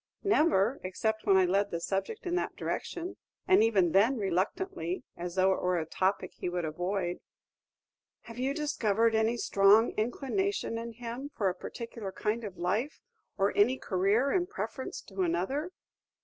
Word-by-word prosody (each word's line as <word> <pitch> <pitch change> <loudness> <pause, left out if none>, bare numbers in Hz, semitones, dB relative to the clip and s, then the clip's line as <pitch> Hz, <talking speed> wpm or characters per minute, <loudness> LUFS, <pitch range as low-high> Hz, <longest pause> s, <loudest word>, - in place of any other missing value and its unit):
"Never, 300 - +3
except 220 +4 -2
when 195 -1 +6
I 190 - +5
led 200 +3 +1
the 170 - -3
subject 195 - -3
in 350 - -2
that 355 - -1
direction; 355 +2 -4 0.3
and 375 -8 +6
even 195 -7 +3
then 220 +9 +4
reluctantly, 255 - -2
as 175 0 -5
though 190 0 +4
it - - -3
were 180 0 +1
a 160 - -1
topic 190 +4 -1
he - - -4
would 175 -1 -2
avoid." 175 +3 -2 1.0
"Have 230 +1 -10
you 270 +2 0
discovered 230 -7 +1
any 220 +2 +2
strong 205 +1 +5
inclination 265 - -1
in 230 0 -6
him 245 +4 -6
for 200 -4 +2
a - - -2
particular 225 +2 -7
kind 215 +4 -2
of 195 -4 -7
life, 215 - -1 0.4
or 195 +1 +1
any 245 +6 +4
career 205 +8 +1
in 360 -2 +1
preference 225 - -5
to 195 -1 -5
another?" 185 - 0
215 Hz, 165 wpm, -30 LUFS, 190-260 Hz, 1.0 s, when